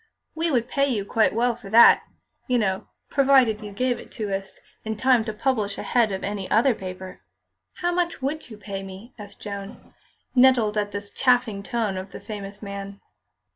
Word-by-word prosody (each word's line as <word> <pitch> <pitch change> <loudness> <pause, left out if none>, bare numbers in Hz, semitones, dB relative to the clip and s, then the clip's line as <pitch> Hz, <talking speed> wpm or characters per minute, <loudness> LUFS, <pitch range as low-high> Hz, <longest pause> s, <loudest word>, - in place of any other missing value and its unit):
We 330 +1 -1
would 245 -5 +1
pay 275 +1 +1
you 215 -7 -1
quite 220 +2 +2
well 240 +1 +2
for 225 -4 -12
that, 230 +3 +8 0.5
you 250 - +2
know, 190 -4 -1 0.2
provided 265 -6 +4
you 210 -1 -7
gave 245 +4 -1
it - - -13
to 205 -3 -2
us 195 0 -8 0.2
in 220 -1 -4
time 255 0 +4
to 220 - -2
publish 210 -3 -1
ahead 235 -4 +1
of 190 - -4
any 200 -1 -4
other 240 +4 +4
paper." 185 -2 -8 0.6
"How 350 0 +1
much 350 -1 -1
would 280 +1 -3
you 215 - -10
pay 200 -1 -6
me?" 195 +5 -10
asked 205 -1 -11
Joan, 200 +1 -8 0.4
nettled 245 -5 +4
at 205 -1 -1
this 205 0 -6
chaffing 245 -5 +2
tone 215 -2 -2
of 190 +1 -7
the - - -7
famous 200 -1 -8
man. 200 0 -7
215 Hz, 185 wpm, -24 LUFS, 200-250 Hz, 0.6 s, that